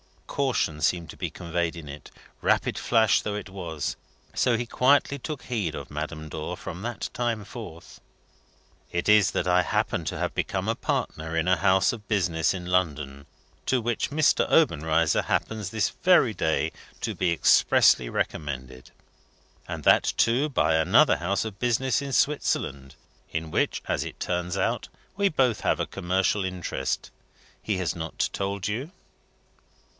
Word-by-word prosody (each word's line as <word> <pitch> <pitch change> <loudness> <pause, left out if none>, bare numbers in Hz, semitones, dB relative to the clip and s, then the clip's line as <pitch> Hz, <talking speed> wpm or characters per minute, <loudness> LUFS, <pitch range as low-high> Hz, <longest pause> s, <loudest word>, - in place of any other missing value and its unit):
A - - -14
caution 125 - 0
seemed 85 0 0
to - - -14
be - - -3
conveyed 85 0 -2
in 80 -3 -9
it, 70 +1 -9 0.3
rapid - - +1
flash 110 -3 +3
though 105 - -3
it 105 - -6
was; 85 -6 -4 0.4
so 120 -2 +2
he 120 - -2
quietly 140 +3 +2
took 150 +1 -6
heed 105 - -2
of - - -8
Madame 75 +1 -5
Dor 75 0 -5
from 90 - -7
that 120 0 -4
time 115 -3 -1
forth. 95 -8 -10 0.9
"It 85 - -2
is 105 -1 +6
that - - -1
I 90 0 +4
happen 85 - -1
to - - -3
have - - -2
become - - -2
a - - +2
partner 80 +1 -3
in 80 +1 +1
a 90 -1 +4
House 95 +1 +3
of 105 -3 -9
business 85 -6 +1
in 90 -2 -6
London, 75 -6 -1 0.4
to 130 - +3
which 120 0 -1
Mr. 155 +1 +2
Obenreizer 80 - +3
happens 110 -4 -1
this 105 0 0
very 175 -11 +3
day 80 -4 0 0.3
to - - -2
be 90 - 0
expressly 70 -6 +4
recommended: 65 -3 -4 0.8
and - - -5
that, - - +4
too, 125 +6 +3
by 130 - +2
another 80 - +5
house 100 +2 -1
of 105 -3 -7
business 125 +1 +1
in 140 -1 -5
Switzerland, 70 - 0 0.4
in 80 0 -3
which - - 0
(as - - 0
it - - -8
turns 90 0 -2
out) - - -1 0.3
we 200 0 +2
both 130 - +2
have - - +1
a - - 0
commercial 95 +3 0
interest. 90 -8 -3 0.5
He 105 -3 -1
has 90 -4 -1
not 80 -1 -2
told 100 -1 -2
you?" 125 +10 -3
95 Hz, 160 wpm, -26 LUFS, 80-115 Hz, 0.9 s, is